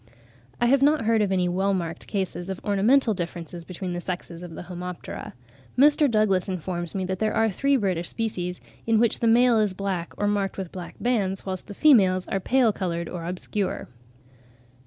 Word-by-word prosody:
I 240 - +3
have 270 +3 +4
not 290 -3 +3
heard 225 -1 +3
of 200 -2 +1
any 185 -2 +2
well 190 +2 +1
marked 170 -3 -4
cases 190 -2 -3
of 190 -2 -4
ornamental 220 +5 +3
differences 170 -2 -6
between 180 +1 -5
the 175 - -3
sexes 175 -2 -5
of 175 -2 -8
the - - -7
Homoptera. 180 -1 -7 0.4
Mr. 295 +2 +5
Douglas 210 -5 +2
informs 175 -1 -4
me 190 -1 -1
that 185 0 -3
there 215 -1 0
are 225 -1 +3
three 275 +8 +2
British 185 -6 -1
species, 180 -6 -3 0.3
in 225 -1 +4
which 230 0 +2
the 230 - +1
male 235 0 +5
is 205 -3 +1
black 185 -3 -3
or 205 - 0
marked 205 -1 0
with 190 -3 -5
black 180 -2 -8
bands, 200 -6 0
whilst 185 -1 -5
the 205 - -8
females 190 -11 +4
are 195 - 0
pale 240 +2 +3
coloured 170 -3 -3
or 170 -2 -5
obscure. 185 +2 -3
190 Hz, 190 wpm, -25 LUFS, 180-225 Hz, 0.4 s, Mr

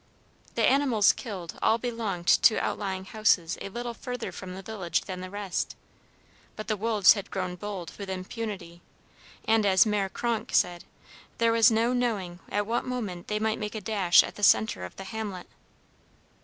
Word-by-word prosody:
The - - +1
animals 260 -7 +4
killed 190 -8 -7
all 220 - +3
belonged 225 -7 -4
to 215 - +5
outlying 190 -2 -3
houses 190 -5 +2
a - - -5
little 240 +3 -5
further 245 -3 -5
from 185 +1 -8
the 190 - -8
village 185 -5 -2
than 185 -1 -7
the 185 - -6
rest; 200 -2 -3 0.8
but 215 - -7
the 215 - 0
wolves 210 -2 +5
had 200 -3 -6
grown 185 -2 -3
bold 185 -3 -6
with 200 -1 -6
impunity, 185 -2 -6 0.6
and, 225 -1 +3
as 195 +2 +5
Mère 205 -3 0
Kronk 235 -2 -2
said, 175 -1 +1 0.5
there 230 0 +3
was 230 0 +6
no 230 +2 +2
knowing 205 -8 -1
at 205 0 0
what 230 +3 -1
moment 215 -9 -5
they 210 - -1
might 220 0 -1
make 210 +1 -4
a - - -2
dash 195 -4 +4
at - - -7
the 205 - -8
centre 110 - +4
of 90 - -10
the 195 - -8
hamlet. 200 -2 -5
205 Hz, 175 wpm, -27 LUFS, 185-225 Hz, 0.8 s, was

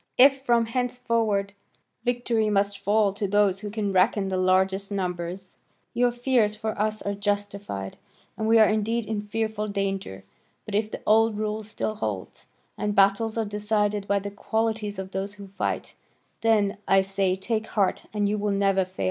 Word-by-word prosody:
If 270 +1 +6
from 235 -3 +3
henceforward 230 -4 0 0.5
victory 240 -3 +1
must 200 -1 +1
fall 205 -1 +2
to 200 0 -2
those 200 -1 +2
who 210 0 -5
can 205 -2 -2
reckon 195 +1 +3
the 190 - -1
largest 190 +2 +2
numbers, 180 -1 -4 0.4
your 245 0 +3
fears 240 -3 +1
for 220 +1 -3
us 215 0 -1
are 200 - -1
justified, 200 - -3 0.4
and 220 - -2
we 225 +1 +5
are 220 -1 +7
indeed 220 +2 0
in 215 -1 -2
fearful 215 0 -2
danger; 195 - -3 0.4
but 210 - -7
if 210 +1 +1
the - - -7
old 220 0 +4
rule 215 0 -2
still 215 0 -3
holds, 105 - -5 0.3
and 210 -1 -1
battles 200 +3 +3
are 225 - +1
decided 210 0 -1
by 200 - +2
the 200 0 -4
qualities 220 0 -2
of 190 0 -6
those 195 +2 -4
who 200 -1 -11
fight, 195 - -3 0.5
then, 210 -3 +2
I 195 0 +5
say, 195 -1 0
take 220 +3 -2
heart 200 -3 0
and 205 -1 0
you 210 +1 0
will 210 +1 0
never 195 -1 +2
fail. 185 - -20
205 Hz, 175 wpm, -26 LUFS, 195-220 Hz, 0.5 s, are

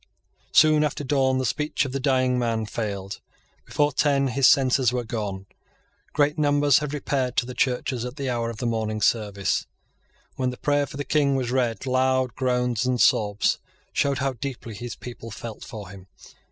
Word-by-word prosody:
Soon 155 -1 +5
after 150 -1 -2
dawn 130 -1 +2
the 130 - 0
speech 150 +4 0
of 135 - -4
the 135 - -2
dying 130 -2 +2
man 115 -2 0
failed. 100 -3 -5 0.4
Before 145 0 +1
ten 140 -2 +2
his 130 +1 +4
senses 130 -2 +4
were 125 -1 -1
gone. 105 -4 -4 0.7
Great 150 +1 +1
numbers 145 -2 +4
had 150 -1 -4
repaired 135 -3 -2
to 125 - +3
the 125 - -7
churches 125 -1 -1
at 125 +1 -6
the 140 -2 -4
hour 120 -2 -1
of 115 - -7
morning 110 -2 -1
service. 100 -3 0 0.7
When 130 -1 0
the 125 - -6
prayer 145 -1 +1
for 140 - -9
the 145 - -2
King 140 0 +2
was 125 -2 -1
read, 125 -1 0
loud 130 -1 +1
groans 125 -3 0
and 125 -1 0
sobs 105 -2 +3 0.3
showed 140 -1 +1
how 135 0 -1
deeply 120 -2 -6
his 120 +3 -6
people 120 -2 -9
felt 110 +1 -8
for 105 -4 -8
him. 95 -1 -12
125 Hz, 180 wpm, -24 LUFS, 115-140 Hz, 0.7 s, Soon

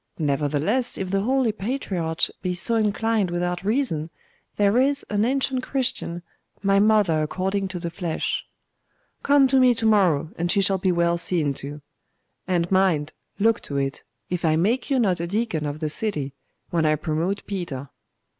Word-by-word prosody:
Nevertheless 150 - 0
if 190 -1 -4
the 195 0 +1
holy 255 +1 +2
patriarch 195 -7 -3 0.2
be 180 -1 -2
so 205 +6 -1
inclined 220 -2 +1
without 175 +1 -2
reason, 205 - 0 0.5
there 205 +3 +3
is 275 +2 +1
an 205 0 +2
ancient 260 +1 +1
Christian, 240 -11 -2 0.4
my 195 0 +4
mother 205 -7 +3
according 190 +5 -1
to 185 -1 -6
the 170 -1 -4
flesh 170 -2 -2 0.4
' - - -45
'Come 280 -1 +5
to 265 0 +4
me 250 -2 +5
to 225 - -3
morrow, 175 -8 +3
and 175 +1 +1
she - - +3
shall 195 0 +2
be 185 0 +2
well 170 0 +1
seen 160 -5 0
to. 145 +1 -8 0.6
And 175 -1 0
mind 170 -6 +2 0.2
look 225 +2 +2
to 140 - -4
it, 135 0 -2 0.3
if 180 -1 -3
I 155 -2 +3
make 225 - +1
you 275 - +2
not 195 -8 +2
a 170 - -2
deacon 190 -6 -1
of 145 +1 -5
the 155 - -1
city 150 -7 -2 0.4
when 170 -2 +1
I 155 0 +3
promote 165 +6 -2
Peter. 160 -9 -5
185 Hz, 175 wpm, -24 LUFS, 160-220 Hz, 0.6 s, Come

